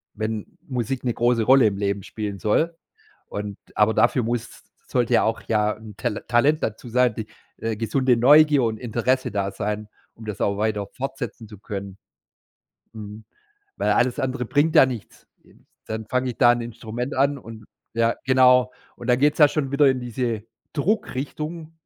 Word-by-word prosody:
wenn 110 -1 -4
Musik 125 0 -3
'ne 120 -2 0
große 120 -1 +2
Rolle 130 -1 +6
im 100 -1 -2
Leben 100 0 -1
spielen 100 -1 -5
soll 160 +10 +1 0.5
und 100 -1 -5 0.2
aber 105 +1 +3
dafür 125 - +3
muss, 120 0 -1
s - - -17 0.2
sollte 120 -2 0
ja - - +4
auch 110 +1 -1
ja 105 -1 +2
'n 110 -2 -12
Tal 115 -3 -3
Talent 140 +6 +3
dazu 110 +2 -4
sein, 125 -1 +2
die, 110 -2 -5 0.3
äh, 115 -1 -3
gesunde 125 +2 +1
Neugier 145 +2 +6
und 110 -1 0
Interesse 125 +2 0
da 100 -1 -1
sein, 105 +1 -3 0.3
um 110 - -13
das 105 -2 -5
auch 100 0 +1
weiter 105 -2 -1
fortsetzen 130 -4 -6
zu 105 -2 -12
können. 100 -2 -7 1.0
Mhm, 105 0 -9 0.5
weil - - 0
alles 125 +1 +1
andere 130 -1 -2
bringt 150 +4 +2
ja 130 - +8
nichts. 120 -5 -8 0.2
Äh, - - -22
s - - -23 0.3
dann 110 0 -5
fange 125 +1 0
ich - - -10
da 120 -2 +7
'n 120 - -2
Instrument 120 +3 -5
an 140 +1 +2
und 115 -2 -11 0.3
ja, 115 0 +2
genau. 125 -1 +5 0.2
Und 120 - -9
dann 125 - +4
geht 145 +2 +4
es - - -14
ja 150 - +9
schon 140 -3 -2
wieder 140 0 +5
in 130 -1 +1
diese 120 -2 -3 0.3
Druckrichtung 155 -2 -3
120 Hz, 185 wpm, -23 LUFS, 110-130 Hz, 1.0 s, ja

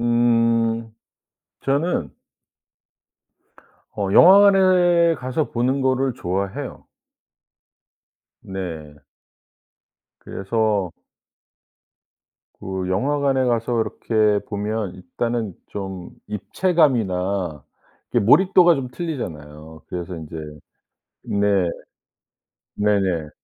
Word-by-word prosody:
음. 115 -1 +1 0.7
저는 140 - 0 1.8
어 100 -2 -3
영화관에 185 - +6
가서 130 +2 -3
보는 130 +3 0
거를 130 -1 +1
좋아해요. 95 +1 -4 1.6
네. 80 -6 -8 1.2
그래서 100 -2 -1 1.7
그 95 -1 -4
영화관에 135 +6 +1
가서 120 -1 0
이렇게 110 -2 0
보면 105 -1 -3
일단은 110 +3 -3
좀 95 -3 -7 0.2
입체감이나 100 - 0 0.5
이게 - - +2
몰입도가 175 - +5
좀 130 -2 -4
틀리잖아요. 80 - -7
그래서 90 0 -5
인제 80 0 -8 0.9
네. 100 -3 +1 1.1
네네. 95 -6 0
110 Hz, 160 characters per minute, -21 LUFS, 95-130 Hz, 1.8 s, 영화관에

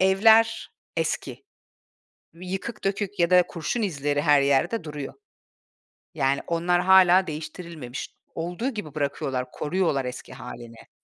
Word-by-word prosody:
evler 220 +4 +4 0.3
eski. - - -3 0.9
Yıkık 190 +6 -6
dökük 200 0 -2
ya 170 -1 +3
da 180 0 +6
kurşun 170 +8 -3
izleri 145 -7 -1
her 145 -2 +5
yerde 140 +9 +1
duruyor. 150 -2 -6 1.0
Yani, 135 +1 +1
onlar 175 +1 +1
hâlâ 190 0 +6
değiştirilmemiş. 155 -4 -7 0.3
Olduğu 175 +9 -2
gibi 210 - -7
bırakıyorlar, 135 -3 -2
koruyorlar 150 -5 0
eski 125 +1 -7
hâlini. 120 -2 -10
170 Hz, 115 wpm, -25 LUFS, 140-190 Hz, 1.0 s, da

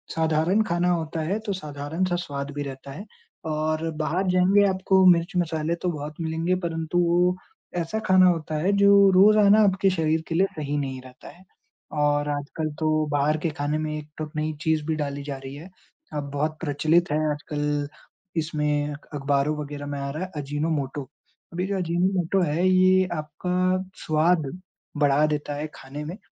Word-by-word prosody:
साधारण 160 +5 +2
खाना 175 -3 0
होता 160 -2 -2
है 185 +7 -1
तो 200 - -1
साधारण-सा 160 +2 -3
स्वाद 145 -4 -4
भी 145 - -3
रहता 135 0 -8
है 185 +10 -8 0.4
और 155 +1 -1
बाहर 175 +6 0
जाएँगे 190 +3 +4
आपको 190 0 +3
मिर्च-मसाले 170 -2 +2
तो 180 - +1
बहुत 150 -1 -6
मिलेंगे 165 +3 0
परंतु 165 0 -2
वो 175 +1 +3 0.4
ऐसा 175 +6 -2
खाना 185 -1 +6
होता 160 -2 -2
है, 195 - +3
जो 200 0 +6
रोज़ाना 205 +2 +6
आपके 195 -1 +3
शरीर 160 -3 +1
के 165 - -3
लिए 190 +3 +3
सही 145 -2 -3
नहीं 135 -2 -3
रहता 130 0 -13
है। 185 - -19 0.6
और 145 0 +2
आजकल 145 +2 -3
तो 155 -1 +1
बाहर 145 +2 +2
के - - +2
खाने 145 +1 0
में 155 0 -3
एक 150 0 -8
तो 155 -1 -4
नई 155 +1 -1
चीज़ 160 -2 +1
भी 160 -1 -1
डाली 140 -2 -3
जा 140 -2 -5
रही 135 +1 -9
है। 160 +6 -10 0.4
अब 145 -2 -4
बहुत 155 +2 -2
प्रचलित 155 +2 +1
है 150 - +2
आजकल 145 -1 -2 0.5
इसमें 150 -2 0
अख 150 - -12
अखबारों 140 +1 +1
वगैरह 145 -1 -6
में 145 -1 -4
आ 140 0 -3
रहा 155 +6 -4
है 185 - -7
अजीनोमोटो। 145 -1 -2 0.5
अभी 180 +2 -1
जो 200 0 -1
अजीनोमोटो 180 +1 +1
है 170 +4 +1
ये 185 0 +5
आपका 155 +3 -4 0.5
स्वाद 155 0 +2 0.5
बढ़ा 145 0 +3
देता 150 -1 -2
है 150 +2 -4
खाने 140 +3 -8
में 170 +6 -6
155 Hz, 175 wpm, -25 LUFS, 145-180 Hz, 0.6 s, खाना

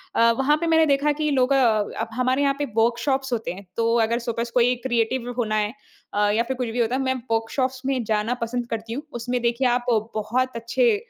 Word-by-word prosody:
अ, 230 0 +5
वहाँ 295 +3 +3
पे 335 - 0
मैंने 320 -1 +5
देखा 285 0 +2
कि 305 - +1
लोग 265 0 +3
अ, 225 -4 +2
हमारे 255 +3 +1
यहाँ 280 -1 +3
पे 290 - 0
वर्कशॉप्स 240 +3 +1
होते 225 -2 -2
हैं। 195 +2 -11
तो 230 0 +2
अगर 235 +1 0
सपोज़ 235 0 -3
कोई 245 0 +3
क्रिएटिव 240 +1 0
होना 215 -3 0
है 210 +1 0 0.4
अ, 205 0 +2
या 220 +3 +2
फिर 260 +2 -4
कुछ 250 -1 -2
भी 235 +2 -3
होता 235 +1 +1
है, 265 - 0
मैं 260 -1 +1 0.2
वर्कशॉप्स 255 +3 -1
में 265 -2 0
जाना 215 +2 0
पसंद 240 +1 -2
करती 225 0 -4
हूँ। 280 +5 -4 0.2
उसमें 245 +1 -2
देखिए 240 +2 +1
आप 245 0 +1 0.3
बहुत 250 +4 -1
अच्छे 330 - +2
240 Hz, 215 wpm, -23 LUFS, 230-265 Hz, 0.4 s, अ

